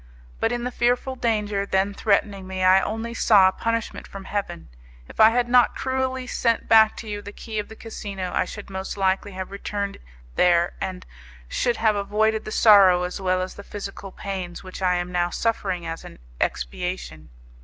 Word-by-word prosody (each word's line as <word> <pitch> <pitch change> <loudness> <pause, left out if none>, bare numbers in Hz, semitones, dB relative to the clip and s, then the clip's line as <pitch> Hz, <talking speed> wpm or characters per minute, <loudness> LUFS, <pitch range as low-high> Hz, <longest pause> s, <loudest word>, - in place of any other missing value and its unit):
But 225 - +1
in 240 0 -2
the 250 - -2
fearful 245 +2 0
danger 210 -5 0
then 195 0 0
threatening 200 -2 0
me 185 0 -3
I 185 +1 +6
only 225 +3 -3
saw 205 -4 +5
a - - +3
punishment 230 +2 -3
from 195 -1 -9
Heaven. 195 -4 -4 0.4
If - - -14
I 220 - +9
had 240 +1 +1
not 245 0 +4
cruelly 260 0 -2
sent 235 -2 0
back 220 -1 +6
to 225 - -8
you 205 -1 -4
the 205 0 -9
key 220 0 -5
of 210 - -4
the 220 - -10
casino, 200 -5 -6
I - - +1
should 200 +1 -9
most 190 +1 -5
likely 195 +1 0
have 190 0 -6
returned 200 0 -4 0.4
there, 175 -1 +3
and 185 -1 -4 0.4
should 240 - 0
have 220 -2 +2
avoided 215 +2 0
the 215 - -6
sorrow 195 -5 +6
as 180 +2 -4
well 185 -1 +1
as 185 - -6
the 200 - -11
physical 195 -1 -7
pains 185 -3 -6
which 185 0 -9
I 180 -1 +2
am 175 0 -3
now 175 -1 +1
suffering 190 -4 -1
as 165 0 -5
an - - -11 0.2
expiation. 80 - -3
200 Hz, 190 wpm, -24 LUFS, 185-220 Hz, 0.4 s, I